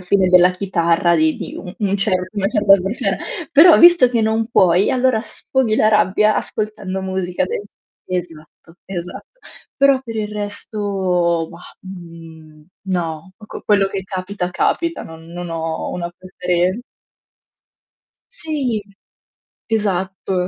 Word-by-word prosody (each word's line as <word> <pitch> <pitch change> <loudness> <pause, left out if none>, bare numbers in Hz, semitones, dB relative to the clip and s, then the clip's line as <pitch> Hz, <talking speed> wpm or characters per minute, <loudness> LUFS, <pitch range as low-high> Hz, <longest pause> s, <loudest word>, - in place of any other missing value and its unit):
fine 185 +1 +2
della 180 0 +7
chitarra 170 -2 +1
di 155 -1 +2
di - - -7
un 180 - -8
un 200 -2 0
cer 195 -1 +1 0.2
una 200 -2 -1
certa 205 -4 +4
persona." 195 +5 -2 0.3
Però 325 +4 +8
visto 345 -7 +7
che 235 -2 0
non 220 +1 0
puoi 185 -2 +4
allora 255 -3 +2
sfoghi 235 -1 -1
la 215 - +4
rabbia 210 0 +3
ascoltando 200 -3 -3
musica 185 -1 -2
de 185 - -4 0.4
Esatto, 165 -2 -7
esatto. 180 - -8 0.4
Però 275 -1 +5
per 230 - -7
il 210 -1 -2
resto, 195 -5 -2
bah, 170 0 -13
mhmm, 165 -4 -12 0.2
no, 170 0 -3
ecco, 215 - -10
quello 200 -2 +3
che 195 -1 -4
capita 185 -1 -4
capita, 335 - -1
non 160 0 -11
non 175 0 -6
ho 165 -1 -3
una 175 -1 -4
prefere 180 +2 -1 1.5
Sì. 280 - -2 0.9
Esatto. 190 -3 -1
190 Hz, 130 wpm, -19 LUFS, 175-215 Hz, 1.5 s, Però